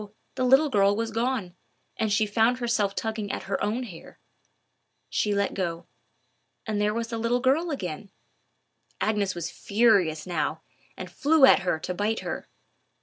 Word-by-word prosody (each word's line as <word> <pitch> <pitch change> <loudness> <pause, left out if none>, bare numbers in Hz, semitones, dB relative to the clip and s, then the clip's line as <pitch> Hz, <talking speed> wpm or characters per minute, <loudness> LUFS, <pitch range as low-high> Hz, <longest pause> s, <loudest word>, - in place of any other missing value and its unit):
the 260 - -2
little 270 +4 +4
girl 200 -2 +3
was 225 +1 -2
gone, 225 -5 -2 0.4
and 220 -1 -1
she 215 +1 +3
found 225 +4 +2
herself 230 -5 0
tugging 220 -2 -3
at - - -4
her - - -2
own 225 +5 -1
hair. 180 -9 -11 0.9
She 210 - 0
let 200 -1 0
go; 170 -3 -3 0.8
and 215 -2 -1
there 210 0 +2
was 230 +1 -3
the 230 -1 -3
little 235 +2 +1
girl 275 +7 +2
again! 200 - -5 0.9
Agnes 205 -3 0
was 170 -1 -4
furious 200 -8 +2
now, 180 -2 -2 0.3
and - - -7
flew 300 -1 +4
at - - +6
her 180 -4 -1
to 180 - -3
bite 210 +4 -1
her. - - -5
215 Hz, 160 wpm, -26 LUFS, 195-240 Hz, 0.9 s, at